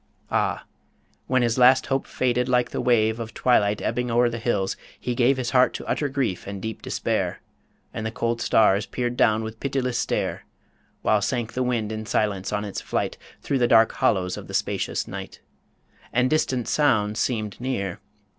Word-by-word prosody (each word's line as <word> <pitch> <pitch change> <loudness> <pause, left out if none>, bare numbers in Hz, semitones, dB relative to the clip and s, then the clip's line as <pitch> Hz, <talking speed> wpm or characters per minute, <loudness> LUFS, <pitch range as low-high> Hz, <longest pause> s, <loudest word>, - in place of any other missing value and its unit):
Ah! - - 0 0.6
when 130 -1 +2
his 120 +1 +1
last 130 +1 +6
hope 135 0 -1
faded 125 0 0
like 125 -1 +2
the - - -2
wave 110 -2 +2
Of 115 -1 -6
twilight 105 -5 +2
ebbing 125 +2 -1
o'er 120 +1 +3
the 115 - -4
hills, 105 -5 0 0.2
he 125 - -2
gave 125 +2 +3
His 125 -1 -2
heart 130 -1 +4
to - - -6
utter 145 - -1
grief 130 -11 -2
and 100 0 -5
deep 110 +2 -5
despair; - - -2 0.5
And 110 - -4
the 110 - -1
cold 115 +1 -2
stars 105 -2 +3
peer'd 120 -1 -2
down 110 -2 +3
with 110 0 -7
pitiless 130 -3 -1
stare, - - -1 0.6
While 105 -1 +3
sank 115 +2 -2
the 130 - -2
wind 120 -4 0
in 110 0 -5
silence 100 -3 0
on 105 0 -1
its 100 - -5
flight - - -2 0.3
Through 140 - 0
the 120 - +3
dark 115 -1 +5
hollows 90 -2 0
of - - -8
the - - -5
spacious - - -1
night; - - -7 0.7
And 125 +3 +2
distant 130 -7 +1
sounds 110 -7 +2
seem'd 110 -3 -2
near. 100 -8 -2
120 Hz, 185 wpm, -24 LUFS, 110-125 Hz, 0.7 s, last